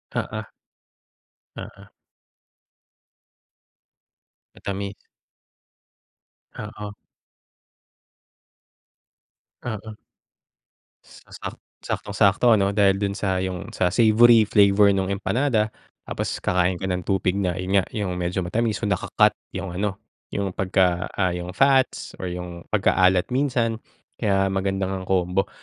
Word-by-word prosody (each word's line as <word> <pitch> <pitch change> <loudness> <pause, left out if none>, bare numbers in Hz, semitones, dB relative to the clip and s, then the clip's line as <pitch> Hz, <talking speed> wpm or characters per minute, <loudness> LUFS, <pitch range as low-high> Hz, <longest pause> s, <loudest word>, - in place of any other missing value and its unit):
Oo. - - -4 1.1
Oo. 100 0 -10 2.6
Matamis. 100 0 -4 1.7
Oo. 105 -1 -7 2.7
Oo, 110 -2 -5 1.1
sa - - -19
sa - - -6 0.4
saktong 100 - -3
sakto 100 +3 +4
ano 100 -1 +2
dahil 100 -1 +4
do'n 100 -1 -1
sa 95 -3 -1
yung 95 -2 -4
sa 90 - +1
savory 115 +3 +6
flavor 100 -1 +5
nung 95 -1 0
empanada, 110 +2 0 0.3
tapos - - -3
kakain 90 0 +2
ka 90 - -7
ng 90 -1 -1
tupig 95 -2 +1
na 90 -3 -1
'yon 90 +1 -4
nga, - - -4
'yong 100 -4 -2
medyo 90 +2 -1
matamis 110 +4 0
naka-cut 100 -3 +2 0.2
'yong 95 -2 -5
ano 105 -2 -1 0.4
'yong 100 -2 -2
pagka, 90 -1 +1
ah, 95 -2 +1
'yong 90 +1 -6
fats 135 -1 +2
or 95 - -3
'yong 90 -1 -7
pagkaalat 95 0 +3
minsan 125 -4 0 0.4
kaya 95 -2 +2
maganda 95 0 -1
ngang 95 -1 -5
combo. 95 +1 +1
95 Hz, 110 wpm, -23 LUFS, 90-105 Hz, 2.7 s, savory